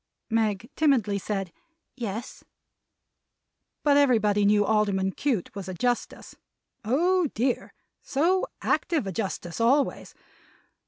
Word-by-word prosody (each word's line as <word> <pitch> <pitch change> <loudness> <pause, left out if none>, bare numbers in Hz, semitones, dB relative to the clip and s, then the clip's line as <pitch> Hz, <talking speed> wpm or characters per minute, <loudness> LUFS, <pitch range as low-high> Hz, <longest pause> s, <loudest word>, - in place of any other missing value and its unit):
Meg 220 -1 0
timidly 240 -10 +2
said, 195 -3 -4 0.4
"Yes." 225 -2 -6 1.4
But 285 -1 +4
everybody 215 -7 +3
knew 205 0 +4
Alderman 200 -3 +1
Cute 240 -5 -2
was 195 -2 -6
a 185 - -5
Justice! 245 +5 -2 0.5
Oh 340 - +2
dear, 245 +2 -1 0.3
so 345 +7 +1 0.2
active 325 - 0
a 195 - -3
Justice 190 -1 -4
always! 270 +5 +1
225 Hz, 105 wpm, -26 LUFS, 200-275 Hz, 1.4 s, But